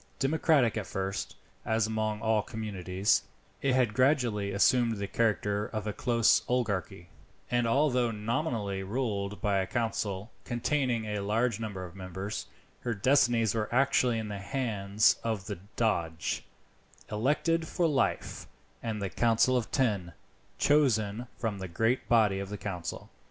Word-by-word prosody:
Democratic 140 -4 +2
at 105 - -3
first, 95 0 -3 0.3
as 110 -1 +1
among 110 -1 -2
all 110 -1 +3
communities, 100 -3 0 0.4
it 135 -2 +2
had 125 -4 +2
gradually 120 -6 +2
assumed 115 +3 +3
the 100 - -2
character 105 -1 0
of 110 -2 -4
a 105 - -2
close 115 0 +3
oligarchy, 110 -8 -2 0.4
and 120 -1 +2
although 125 -1 +2
nominally 110 -3 -2
ruled 105 -2 -2
by 100 -2 +2
a 95 - -1
council 110 -3 -2
containing 120 -1 0
a 105 -1 -2
large 110 +3 0
number 100 -5 -4
of 90 0 -11
members, 95 +2 -5 0.3
her 120 -2 -2
destinies 120 -1 +3
were 110 -2 -1
actually 125 -2 +3
in 110 -1 -3
the 100 -1 -5
hands 105 -2 +1
of 110 -5 -2
the - - -5 0.2
Doge, 85 -8 -1 0.7
elected 150 +9 +1
for 175 - 0
life, 145 -4 0 0.3
and 110 -3 -3
the - - 0
Council 120 +2 +3
of 120 -3 0
Ten, 105 -10 0 0.4
chosen 120 -6 +2
from 110 -4 -2
the 95 - -5
great 115 +8 0
body 105 -5 +4
of 100 0 -5
the 105 - -5
council. 90 -5 -5
110 Hz, 145 wpm, -30 LUFS, 100-120 Hz, 0.7 s, body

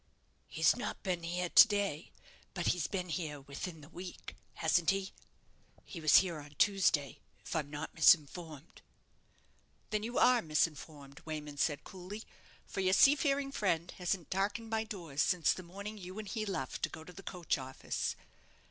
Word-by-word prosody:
"He's - - +3
not - - -5
been 180 -3 -1
here 175 +1 -2
to 230 - +9
day; 200 -7 -2 0.4
but 175 - -2
he's 175 -4 -2
been 180 -3 -3
here 155 -4 -3
within 140 +4 -7
the 145 - -13
week, 180 +1 -9 0.2
hasn't 165 +1 +2
he? 195 0 0 0.7
He 170 - -8
was 155 -2 +5
here 175 -5 +5
on 145 0 -12
Tuesday, 185 -9 +2 0.3
if - - -5
I'm 150 -3 -1
not 145 +2 -6
misinformed." 160 0 +2 1.1
"Then 215 -1 0
you 235 +3 -4
are 250 -1 +5
misinformed," 150 -3 -2
Wayman 150 -2 -6
said, 145 0 0
coolly; 195 +3 -8 0.4
"for - - -6
your 185 -1 +2
seafaring 275 +3 +4
friend 175 -8 0
hasn't 180 -1 -2
darkened 205 +4 -1
my 220 0 0
doors 170 -9 -4
since 180 -4 +3
the - - -7
morning 200 +4 -8
you 185 +1 -8
and 215 -1 -6
he 215 0 -3
left 135 -10 -3
to - - 0
go 160 - -9
to 180 - -12
the 185 - -10
coach 180 -6 -2
office." 130 0 -3
175 Hz, 165 wpm, -33 LUFS, 155-195 Hz, 1.1 s, to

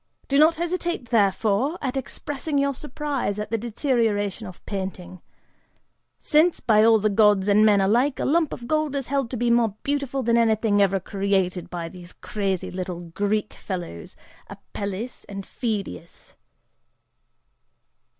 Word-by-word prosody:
Do 275 - +2
not 315 +2 +6
hesitate, 345 -6 -3
therefore, 220 - +2
at 265 -2 -3
expressing 285 +2 -3
your 280 0 +2
surprise 275 -6 -3
at 210 +1 -5
the 225 - +1
deterioration 220 -3 -1
of 185 - -13
painting, 185 -2 -5 1.0
since, 320 +3 +3
by 215 -2 +4
all 225 0 +6
the 215 0 +1
gods 205 -2 +4
and 210 +1 +5
men 205 -2 +5
alike, 240 +8 +2
a - - -1
lump 320 +1 +2
of 235 - -7
gold 310 0 0
is 275 -2 -2
held 275 -2 -1
to 250 - -4
be 240 +1 +1
more 230 -4 +2
beautiful 280 -2 -1
than 235 0 +3
anything 220 -2 +2
ever 195 -1 +3
created 190 -2 -1
by 170 -2 -4
those 175 +1 -11
crazy 195 -3 -3
little 180 -2 -6
Greek 210 +3 -1
fellows, 175 - -7 0.3
Apelles 205 +4 -6
and 195 -1 -6
Phydias!" 205 - -5
220 Hz, 145 wpm, -24 LUFS, 195-270 Hz, 1.0 s, not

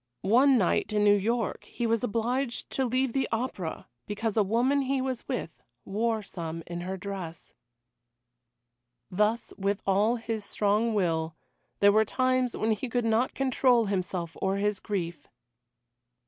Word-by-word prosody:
One 255 +6 +5
night 190 -1 +1
in 210 -1 +2
New 205 0 +6
York 225 +3 -1
he 240 - -4
was 230 +1 +1
obliged 245 +3 -1
to 265 - 0
leave 255 0 0
the 270 -1 +1
opera 225 -8 -3 0.2
because 210 +1 -2
a 220 - +4
woman 240 +8 +2
he 270 0 0
was 260 -2 -3
with 245 -11 -4 0.2
wore 220 +2 -1
some 165 -4 -6
in 175 0 -5
her 190 +2 -4
dress. 185 -4 -7 1.6
Thus, 210 +5 0
with 200 +1 0
all 205 +4 +3
his 225 -2 -4
strong 210 +3 +1
will, 165 -4 0 0.5
there 205 0 +7
were 215 +1 +5
times 255 +2 0
when 220 +1 +1
he 230 +4 -2
could 245 0 0
not 225 +3 +1
control 255 -3 +3
himself 180 -4 -2
or 190 0 +1
his 205 0 0
grief. 170 -8 -4
215 Hz, 150 wpm, -28 LUFS, 195-245 Hz, 1.6 s, there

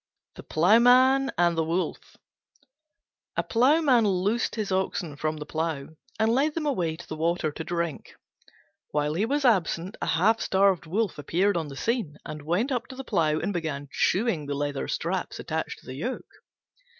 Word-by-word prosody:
THE - - -10
PLOUGHMAN 250 +9 +5
AND 170 0 +3
THE 165 - +1
WOLF 170 +3 -3 1.2
A - - +2
Ploughman 255 -1 +4
loosed 200 +5 0
his 215 -3 -3
oxen 185 -5 -1
from 155 +1 -2
the 150 - -6
plough, 155 -3 -3 0.3
and 220 +1 +3
led 290 +4 +1
them 325 -2 -2
away 180 - 0
to 170 - -11
the 155 - -5
water 165 0 0
to 160 - -6
drink. 170 -2 -4 0.7
While 150 0 0
he 200 +7 0
was 285 +2 0
absent 185 -4 +1
a - - -2
half 210 +8 +3
starved 190 -3 +2
Wolf 200 0 -1
appeared 185 +7 +1
on 165 -3 -1
the 135 -1 -9
scene, 225 - -2
and 150 0 -7
went 180 - 0
up 245 -2 -1
to 260 - -10
the 270 - -6
plough 155 -9 +1
and 200 - -2
began 155 -5 -4
chewing 185 -8 +1
the 145 - -2
leather 145 -1 -2
straps - - -2
attached - - -4
to - - -22
the 130 - -7
yoke. 180 - -5
180 Hz, 175 wpm, -26 LUFS, 155-230 Hz, 1.2 s, PLOUGHMAN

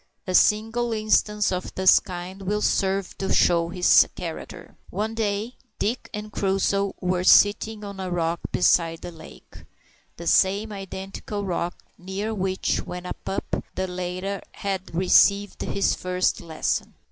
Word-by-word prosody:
A 185 - -3
single 225 +4 +3
instance 215 -1 +2
of 180 0 -4
this 190 0 +6
kind 185 +1 -8
will 210 +2 -1
serve 195 -1 0
to 195 - -2
show 170 -1 +3
his 180 0 +5
character. - - -8
One 215 +2 -2
day 220 +1 -2 0.2
Dick 235 +4 -2
and 210 0 -6
Crusoe 195 0 0
were 180 -1 0
sitting 210 +3 +4
on 200 -1 -7
a 185 -1 -3
rock 170 -1 -1
beside 165 -2 +2
the - - -7
lake 165 - -14 0.6
the 170 - -8
same 200 +5 +3
identical 195 +1 -6
rock 175 -1 -2 0.2
near 195 +4 -4
which, 190 -2 -1
when 180 0 -7
a - - -3
pup, 195 - -4
the 190 - -1
latter 185 +2 -4
had 190 -3 -4
received 200 +3 +4
his 200 - +1
first 180 0 -1
lesson. 160 -2 -2
190 Hz, 145 wpm, -24 LUFS, 180-205 Hz, 0.6 s, this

